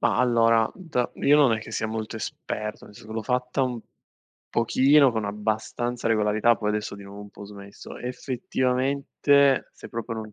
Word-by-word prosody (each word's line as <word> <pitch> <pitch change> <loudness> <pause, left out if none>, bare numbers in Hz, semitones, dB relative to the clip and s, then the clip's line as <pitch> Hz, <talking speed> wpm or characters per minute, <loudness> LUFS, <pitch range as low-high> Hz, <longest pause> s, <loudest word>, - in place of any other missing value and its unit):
Ma - - +2
allora 115 -2 +3
d 160 -10 -2
io 145 +1 +4
non 140 -5 +5
è 110 - 0
che 110 - -10
sia 110 0 -2
molto 110 0 -5
esperto, 105 0 -5
nel - - -15
senso 110 +2 -11
l'ho 110 0 -3
fatta 125 +2 -1
un 125 -2 -2 0.7
pochino 135 +4 +4
con 110 -2 -2
abbastanza 110 +3 -2
regolarità, 110 +1 +3
poi 105 -1 -1
adesso 105 -1 -3
di 100 - -11
nuovo 100 +1 -10
ho - - -7
un 105 - -12
po' 100 - -11
smesso. 100 0 -11
Effettivamente 135 +2 +1
se - - -12
proprio 115 -1 -5
non 110 -1 -7
115 Hz, 180 wpm, -25 LUFS, 105-125 Hz, 0.7 s, non